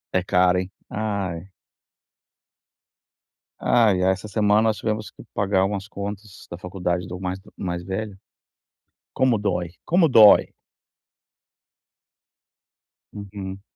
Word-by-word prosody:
É 90 - +2
caro, 90 0 +3
hein. 90 +1 -5 0.2
Ai. 100 -4 -3 2.1
Ai, 105 -6 +3
ai, 95 - +4
essa 95 +2 -4
semana 105 0 +2
nós 110 -1 +1
tivemos 110 -2 -3
que - - -14
pagar 100 -1 +1
algumas 95 0 -2
contas 100 0 -8
da 85 - -6
faculdade 90 -1 -3
do 90 0 -7
mais 95 0 -4 0.2
mais 85 -2 -4
velho. 95 +2 -5 1.0
Como 130 -3 +2
dói, 95 -4 -2 0.2
como 175 -1 +4
dói! 110 -7 +7 2.6
Uhum. 100 -1 -8
100 Hz, 110 wpm, -23 LUFS, 90-105 Hz, 2.6 s, dói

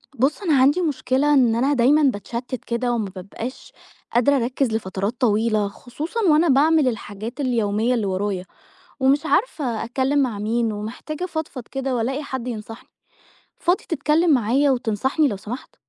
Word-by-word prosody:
بُصّ 270 - +1
أنا 300 -7 +3
عندي 290 +7 +4
مشكلة 290 -2 +1
إن 245 -5 +4
أنا 270 +5 +2
دايمًا 280 +4 +4
باتشتّت 245 +1 -2
كده 240 +1 -1
وما 220 -4 -2
بابقاش 210 +7 -7 0.4
قادرة 250 +4 +4
اركّز 255 0 0
لفترات 200 +2 -3
طويلة، 215 -2 +2
خصوصًا 290 - -6
وأنا 310 +3 +4
باعمل 300 +1 +4
الحاجات 220 0 -5
اليومية 230 -3 +1
اللي 230 -4 0
ورايا، 190 -1 -2 0.5
ومش 275 +3 +3
عارفة 295 - 0
اتكلّم 265 +4 0
مع 240 -6 -1
مين 225 +2 0
ومحتاجة 230 +10 -6
افضفض 315 -7 -4
كده 270 -1 -3
والاقي 265 +5 -1
حد 260 -3 -5
ينصحني، 225 0 -7 0.7
فاضي 355 +2 +1
تتكلّم 320 +2 +2
معايا 265 +4 +3
وتنصحني 260 +5 +1
لو 205 - -3
سمحت؟ 215 +6 -8
250 Hz, 145 wpm, -22 LUFS, 225-285 Hz, 0.7 s, عندي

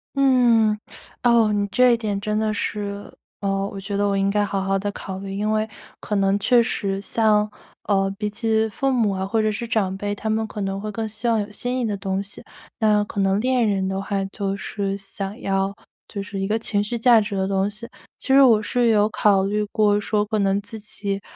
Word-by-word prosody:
嗯， 240 -6 +4 0.5
哦， 235 -3 +4
你 205 -1 +1
这 245 +4 +4
点 210 -4 -2
真 210 +1 -2
的 215 0 0
是， 205 -1 -3 0.3
嗯， 195 -1 -1
我 195 - -7
觉 195 +1 -5
得 205 +1 +1
我 200 - +1
应 195 0 +2
该 205 +1 +2
好 200 -1 -1
好 195 0 0
地 205 +1 -2
考 190 -1 -7
虑。 195 0 -6
因 210 +2 -1
为 215 0 +1 0.4
可 210 - -3
能 195 0 +2
确 235 +4 +4
实 195 -4 -1
像， 210 0 +2 0.3
呃， 195 -1 +1
比 210 -1 -1
起 220 0 +1
父 270 +6 -1
母 230 -5 +2
啊 190 0 -2
或 220 +3 +1
者 215 - +1
是 215 +3 -3
长 215 -5 0
辈， 205 +1 -3
他 215 +2 -4
们 220 0 0
可 210 - -8
能 195 0 -3
会 215 0 -4
更 220 +1 -3
希 220 +3 -3
望 225 -1 +2
有 205 0 -3
新 245 +5 -3
意 245 - 0
的 210 -2 -1
东 190 0 -2
西。 200 +1 -8 0.4
那 210 -2 +3
可 205 -1 -3
能 195 +1 +2
恋 250 0 +2
人 190 -2 0
的 190 0 -2
话， 195 0 -2
就 195 0 -3
是 200 0 -3
想 195 +2 -7
要 195 -2 0 0.4
就 200 - -5
是 195 0 -5
一 - - 0
个 215 +3 0
情 205 -2 0
绪 235 +3 -3
价 235 -1 +6
值 205 -1 -3
的 190 0 0
东 195 0 +1
西。 215 +3 -7 0.3
其 - - -9
实 275 - +8
我 230 -5 +6
是 240 +3 +1
有 210 -2 +4
考 200 -3 +2
虑 210 +2 0
过 210 -1 +3
说 210 0 0
可 215 0 -1
能 195 0 +2
自 205 +2 -8
己， 200 -2 -4
205 Hz, 245 characters per minute, -22 LUFS, 195-220 Hz, 0.5 s, 实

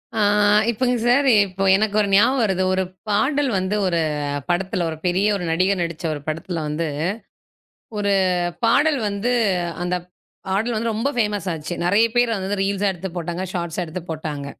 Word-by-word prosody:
ஆ, 220 - 0 0.5
இப்பங்க 250 +2 0
sir, 275 +3 +4 0.2
இப்போ 190 +1 -4
எனக்கு 210 0 -1
ஒரு 205 - 0
ஞாபகம் 240 +6 +4
வருது. 190 -3 +1
ஒரு 190 0 +1 0.3
பாடல் 270 +7 +1
வந்து, 185 +3 -1
ஒரு 170 -2 +1 0.5
படத்துல, 180 0 0
ஒரு 160 - -6
பெரிய 180 +3 +2
ஒரு 180 - -6
நடிகர் 185 +2 +1
நடிச்ச 170 +1 -6
ஒரு 145 - -6
படத்துல 165 +2 -3
வந்து. 155 +2 -2 1.1
ஒரு 200 -1 0 0.5
பாடல் 285 +5 +3
வந்து 205 +5 -1 0.5
அந்தப் 180 0 -2 0.4
பாடல் 220 +5 0
வந்து 230 +1 -1
ரொம்ப 230 +6 0
ஃபேமஸ் 210 -4 -1
ஆச்சு. 160 +1 -5
நறைய 205 +5 +4
பேர் 240 0 +3
அத - - -1
வந்து 200 0 -2
ரீல்ஸ்ஸா 200 +1 +1
எடுத்துப் 185 0 -7
போட்டாங்க, 175 +1 -3
ஷார்ட்ஸ்ஸா 175 0 -3
எடுத்துப் 165 +1 -8
போட்டாங்க. 150 -3 -4
190 Hz, 165 wpm, -21 LUFS, 175-220 Hz, 1.1 s, sir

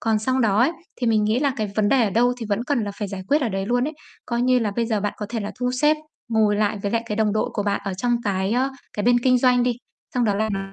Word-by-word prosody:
Còn 220 -1 +1
xong 260 +4 0
đó 210 -4 +2
ấy, 255 +7 +4 0.3
thì 245 - 0
mình 215 -2 +3
nghĩ 215 +3 +2
là 280 0 +1
cái 215 -3 -2
vấn 210 -1 +3
đề 265 0 +4
ở 210 - 0
đâu 240 +5 +3
thì 225 - -4
vẫn 210 +4 -1
cần 245 -6 0
là 205 - -4
phải 205 - -3
giải 190 -1 -6
quyết 295 +2 +3
ở 235 - +1
đấy 195 -1 -3
luôn 245 +3 +1
ấy. 310 - -8 0.3
Coi 235 0 -1
như 255 0 +4
là 220 -4 0
bây 230 - +1
giờ 220 -3 0
bạn 205 0 -1
có 210 - -5
thể 230 -1 -3
là 205 - -5
thu 250 0 +1
xếp, 300 +1 +4 0.3
ngồi 215 -2 +2
lại 210 0 0
với 200 - -1
lại 230 +1 0
cái 210 -2 -3
đồng 215 -2 +2
đội 215 - 0
của 205 - -1
bạn 200 0 0
ở 195 -2 -3
trong 240 +5 0
cái, 195 0 0
ơ, 260 +3 +1 0.2
cái 210 - -3
bên 245 0 +5
kinh 250 +1 +3
doanh 250 -1 +4
đi. 245 -1 0 0.4
Xong 250 -1 +2
đó 205 -3 +2
là 220 +2 0
nói 195 -1 -4
225 Hz, 320 wpm, -23 LUFS, 205-245 Hz, 0.4 s, bên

